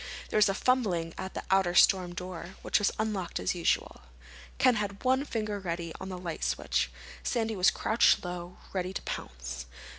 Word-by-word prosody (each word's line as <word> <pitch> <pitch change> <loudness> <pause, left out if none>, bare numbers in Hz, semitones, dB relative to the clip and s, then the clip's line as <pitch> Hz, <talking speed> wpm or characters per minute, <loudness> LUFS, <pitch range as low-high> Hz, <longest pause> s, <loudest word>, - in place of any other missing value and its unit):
There - - 0
was 210 -1 +6
a 195 - 0
fumbling 195 -10 +1
at 190 0 -6
the - - -3
outer 190 -2 +3
storm 180 -2 +5
door, 180 0 -6
which - - +3
was 205 - +3
unlocked 210 -5 -2
as - - 0
usual. 175 - 0 0.6
Ken 255 -1 +5
had 200 -1 -3
one 260 +2 +3
finger 215 -5 -2
ready 170 -3 -4
on 190 - -5
the 185 - -5
light 175 -2 -5
switch. - - 0 0.3
Sandy 225 -2 -1
was 185 +1 +5
crouched 220 -2 +3
low, 175 0 -6 0.2
ready 185 -1 -2
to - - -3
pounce. 65 0 -6
190 Hz, 180 wpm, -30 LUFS, 175-210 Hz, 0.6 s, was